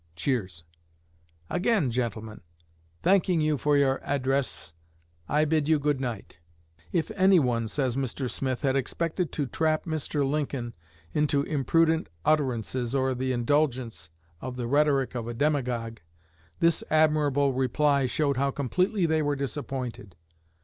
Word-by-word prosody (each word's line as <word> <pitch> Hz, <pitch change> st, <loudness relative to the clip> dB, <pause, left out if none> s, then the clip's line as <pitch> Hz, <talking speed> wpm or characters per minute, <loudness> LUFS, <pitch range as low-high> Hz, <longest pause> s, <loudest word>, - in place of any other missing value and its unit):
[Cheers.] 95 Hz, -, -2 dB, 0.8 s
Again, 180 Hz, -, +1 dB
gentlemen, 110 Hz, -3 st, -3 dB, 0.6 s
thanking 185 Hz, -2 st, +3 dB
you 155 Hz, -1 st, +2 dB
for 145 Hz, -1 st, +2 dB
your 135 Hz, -1 st, +2 dB
address, 135 Hz, -, -1 dB, 0.6 s
I 150 Hz, +2 st, +3 dB
bid 155 Hz, -1 st, +1 dB
you 160 Hz, -, +5 dB
good 145 Hz, -2 st, 0 dB
night. 115 Hz, -8 st, -5 dB, 0.5 s
"If 170 Hz, +3 st, 0 dB
anyone," 165 Hz, -, +3 dB
says 130 Hz, +1 st, -1 dB
Mr. 135 Hz, 0 st, -2 dB
Smith, 130 Hz, 0 st, -3 dB
"had 135 Hz, -1 st, +2 dB
expected 165 Hz, +6 st, -1 dB
to 145 Hz, -, -1 dB
trap 155 Hz, +3 st, 0 dB
Mr. 155 Hz, -3 st, -1 dB
Lincoln 135 Hz, -4 st, -2 dB, 0.4 s
into 145 Hz, -1 st, +2 dB
imprudent 160 Hz, +3 st, +1 dB, 0.2 s
utterances, 130 Hz, -4 st, 0 dB
or 130 Hz, -1 st, +1 dB
the 130 Hz, +1 st, -2 dB
indulgence 125 Hz, -, 0 dB, 0.3 s
of 130 Hz, -1 st, -5 dB
the 125 Hz, -1 st, -3 dB
rhetoric 140 Hz, 0 st, +2 dB
of 120 Hz, -2 st, -4 dB
a 120 Hz, -, -5 dB
demagogue, 120 Hz, -5 st, -1 dB, 0.6 s
this 170 Hz, -1 st, +2 dB
admirable 150 Hz, -3 st, +3 dB
reply 135 Hz, +2 st, +2 dB
showed 140 Hz, 0 st, 0 dB
how 140 Hz, +1 st, +2 dB
completely 180 Hz, -, 0 dB
they 160 Hz, -1 st, +2 dB
were 145 Hz, -1 st, 0 dB
disappointed. 135 Hz, -, -5 dB
140 Hz, 130 wpm, -27 LUFS, 125-155 Hz, 0.8 s, you